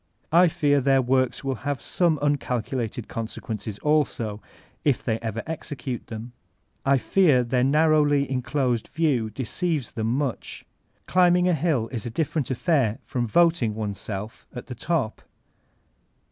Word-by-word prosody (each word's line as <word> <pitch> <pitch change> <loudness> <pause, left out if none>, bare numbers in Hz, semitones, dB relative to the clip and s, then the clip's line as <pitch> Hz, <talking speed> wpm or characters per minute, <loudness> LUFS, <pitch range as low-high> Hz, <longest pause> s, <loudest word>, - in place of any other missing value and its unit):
I 175 +3 +6
fear 145 -3 +2
their 135 0 +4
works 130 0 +1
will 135 -1 -1
have 145 -2 -2
some 170 +5 +1
tincalculated 125 -5 -2
consequences 110 -2 -5
also, 125 -8 0 0.4
if 140 -4 +1
ever 115 -1 -2
they 160 - -2
execute 135 -5 -6
them; 115 +1 -7 0.5
I 135 0 +4
fear 145 -3 +3
their 125 +1 +1
narrowly 145 0 +3
enclosed 125 -2 -1
view 140 -8 0
deceives 135 - -2
them 115 +3 -1
mnch. 140 -4 -3 0.4
Climbing 180 0 +4
a 180 - +3
hill 150 -7 +1
is 120 -3 -5
a - - -3
different 150 +2 -1
affair 130 - +1
from 120 -2 -2
voting 165 -6 +3
oneself 105 +1 -5
at 125 - -6
the 125 - -7
top. 130 -2 -2
130 Hz, 135 wpm, -25 LUFS, 115-150 Hz, 0.5 s, I